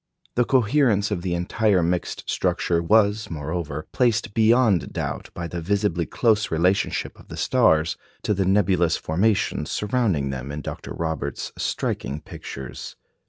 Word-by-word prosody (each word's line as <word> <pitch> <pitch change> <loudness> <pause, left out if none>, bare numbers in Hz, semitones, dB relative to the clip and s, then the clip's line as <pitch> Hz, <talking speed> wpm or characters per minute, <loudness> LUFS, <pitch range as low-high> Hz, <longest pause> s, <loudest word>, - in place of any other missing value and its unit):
" - - -36
The 120 - +3
coherence 120 -5 +3
of 95 -4 -1
the 90 -1 -1
entire 95 +2 +2
mixed 85 +1 -2
structure 85 -1 0
was, 105 +4 +3
moreover, 75 -1 -4
placed 115 -3 +1
beyond 110 -5 +3
doubt - - -4
by 85 - -4
the 85 0 -5
visibly 95 -2 0
close 110 -2 +2
relationship 90 +4 0
of - - -16
the - - -8
stars 80 +1 +3 0.3
to 105 - +1
the 95 -1 0
nebulous 95 -4 +3
formations 95 -2 0
surrounding 105 - 0
them 65 +1 -5
in 75 +1 -5
Dr. - - -7
Roberts's 80 -4 -3
striking 70 +2 -2
pictures. 65 -3 -8
90 Hz, 145 wpm, -24 LUFS, 80-110 Hz, 0.3 s, The